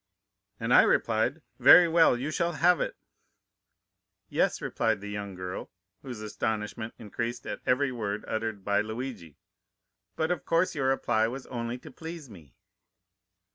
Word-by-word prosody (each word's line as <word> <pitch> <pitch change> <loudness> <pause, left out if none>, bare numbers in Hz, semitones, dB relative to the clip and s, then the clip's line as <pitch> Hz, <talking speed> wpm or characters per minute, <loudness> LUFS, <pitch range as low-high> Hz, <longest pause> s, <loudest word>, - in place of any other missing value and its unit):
"'And - - 0
I - - +9
replied, - - +1 0.2
"Very 180 -1 +9
well, 165 -6 +4
you 135 +5 -3
shall 170 +2 0
have 175 +3 +3
it."' - - -3 1.3
"'Yes,' - - +1
replied 110 -2 0
the 105 +1 -7
young 100 -2 -5
girl, 90 +1 -6 0.3
whose 125 -5 -7
astonishment 110 +1 -3
increased 115 +2 -5
at 105 - -5
every 130 +2 +2
word 105 -4 -4
uttered 110 -3 -3
by 100 0 +2
Luigi, 110 - -6 0.8
'but 160 +2 0
of 175 -5 -2
course 165 +2 +1
your 135 -5 -1
reply 120 -4 +2
was 130 +3 -6
only 120 0 -4
to - - -13
please 160 -5 -9
me. 80 -9 -15
115 Hz, 145 wpm, -28 LUFS, 105-140 Hz, 1.3 s, I